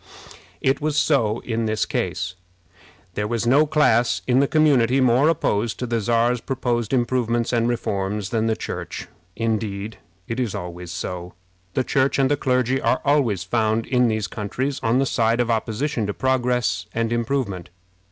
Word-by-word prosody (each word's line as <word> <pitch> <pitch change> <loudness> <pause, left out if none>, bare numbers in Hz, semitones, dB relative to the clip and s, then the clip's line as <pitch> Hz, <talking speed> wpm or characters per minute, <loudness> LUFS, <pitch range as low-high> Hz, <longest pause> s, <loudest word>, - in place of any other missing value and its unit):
It 135 +3 +1
was 150 0 -1
so 120 -8 +2
in 115 -1 -2
this 110 0 0
case. 90 +1 -2 0.8
There 105 +3 -2
was 115 +1 -1
no 140 +6 +4
class 125 -6 +2
in 125 0 +3
the 140 - +3
community 135 -5 +3
more 130 +4 +4
opposed 110 -8 0
to 125 - -3
the 115 -2 -1
Czar's 120 +2 +1
proposed 120 -4 -2
improvements 120 -2 0
and 115 -1 +2
reforms 100 -3 -2
than 115 -1 +1
the 110 - +1
Church. - - -6 0.3
Indeed, 110 -2 -2 0.3
it 115 +2 -3
is 120 -5 -1
always 90 0 -6
so. 90 0 -5 0.4
The 130 - +2
Church 135 +1 +1
and 135 0 +2
the - - +4
clergy 130 -1 +1
are - - +1
always 130 - +2
found 110 +2 0
in 125 -2 +2
these 110 -2 0
countries 120 +8 -3
on 115 +2 +2
the 135 - +2
side 115 -2 +1
of 120 -1 +1
opposition 115 +1 -1
to 105 - -3
progress 125 -8 0
and 115 0 0
improvement. 115 -7 -2
115 Hz, 165 wpm, -22 LUFS, 110-130 Hz, 0.8 s, no